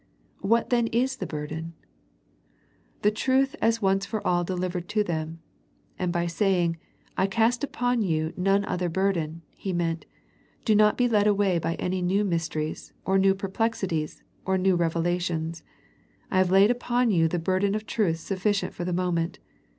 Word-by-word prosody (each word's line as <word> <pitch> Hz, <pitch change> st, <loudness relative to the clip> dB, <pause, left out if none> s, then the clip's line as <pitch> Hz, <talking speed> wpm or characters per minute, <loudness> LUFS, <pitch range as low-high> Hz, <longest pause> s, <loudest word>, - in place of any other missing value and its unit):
What 230 Hz, +5 st, +1 dB
then 235 Hz, -2 st, +3 dB
is 255 Hz, +4 st, 0 dB
the -, -, -4 dB
burden? 155 Hz, +2 st, -5 dB, 1.3 s
The 210 Hz, -, +5 dB
truth 265 Hz, +5 st, +1 dB
as 230 Hz, 0 st, +2 dB
once 195 Hz, 0 st, +2 dB
for 210 Hz, +1 st, -4 dB
all 175 Hz, 0 st, +2 dB
delivered 180 Hz, 0 st, -3 dB
to 210 Hz, -1 st, +2 dB
them; 160 Hz, -2 st, -4 dB, 0.6 s
and 180 Hz, -1 st, 0 dB
by 175 Hz, -1 st, 0 dB
saying, 170 Hz, -1 st, +1 dB, 0.2 s
" -, -, -35 dB
I 190 Hz, -, +3 dB
cast 230 Hz, +5 st, +1 dB
upon 245 Hz, -3 st, 0 dB
you 160 Hz, -4 st, 0 dB
none 195 Hz, +2 st, +2 dB
other 180 Hz, -2 st, -1 dB
burden," 170 Hz, -3 st, -1 dB
He 190 Hz, -, -4 dB
meant, 165 Hz, -1 st, -1 dB, 0.6 s
Do 220 Hz, -, +4 dB
not 210 Hz, 0 st, +4 dB
be 245 Hz, -, +3 dB
led 210 Hz, -3 st, +3 dB
away 200 Hz, -4 st, +2 dB
by 165 Hz, +1 st, -2 dB
any 185 Hz, 0 st, -2 dB
new 190 Hz, +4 st, +2 dB
mysteries, 165 Hz, -4 st, -3 dB
or 195 Hz, 0 st, +3 dB
new 195 Hz, 0 st, +4 dB
perplexities, 195 Hz, -5 st, -2 dB, 0.2 s
or 190 Hz, 0 st, +1 dB
new 185 Hz, 0 st, +3 dB
revelations. 170 Hz, -1 st, -1 dB, 0.7 s
I 185 Hz, -, +3 dB
have 185 Hz, -1 st, +3 dB
laid 195 Hz, +4 st, +6 dB
upon 245 Hz, -1 st, +1 dB
you 165 Hz, -4 st, +3 dB
the 175 Hz, -, -1 dB
bur 185 Hz, +3 st, 0 dB
den 200 Hz, +1 st, +1 dB
of 215 Hz, 0 st, -3 dB
truth 200 Hz, -8 st, 0 dB
sufficient 195 Hz, +4 st, -1 dB
for 175 Hz, -, -5 dB
the 180 Hz, 0 st, -2 dB
moment. 175 Hz, -2 st, -1 dB
185 Hz, 170 wpm, -26 LUFS, 170-210 Hz, 1.3 s, laid